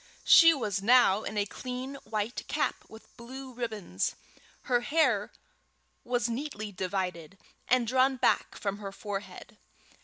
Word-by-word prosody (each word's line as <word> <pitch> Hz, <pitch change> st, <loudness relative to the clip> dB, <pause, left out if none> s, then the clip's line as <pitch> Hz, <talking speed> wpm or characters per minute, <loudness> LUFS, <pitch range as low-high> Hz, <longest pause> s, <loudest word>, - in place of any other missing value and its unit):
She 330 Hz, -1 st, +9 dB
was 215 Hz, -, -2 dB
now 225 Hz, -2 st, +5 dB
in 215 Hz, -, -5 dB
a 205 Hz, -, +1 dB
clean 255 Hz, +5 st, -6 dB
white 215 Hz, +1 st, -3 dB
cap -, -, -1 dB
with 220 Hz, 0 st, -15 dB
blue 260 Hz, +2 st, -9 dB
ribbons. 215 Hz, -, -3 dB, 0.5 s
Her 245 Hz, -1 st, +2 dB
hair 250 Hz, -7 st, +1 dB, 0.7 s
was 245 Hz, -1 st, 0 dB
neatly 230 Hz, -4 st, -4 dB
divided, 185 Hz, -2 st, -4 dB, 0.3 s
and 250 Hz, -1 st, +3 dB
drawn 260 Hz, +3 st, +3 dB
back 255 Hz, -, +1 dB
from 200 Hz, 0 st, -3 dB
her 200 Hz, -2 st, -6 dB
forehead. 200 Hz, 0 st, -7 dB
225 Hz, 130 wpm, -29 LUFS, 200-255 Hz, 0.7 s, She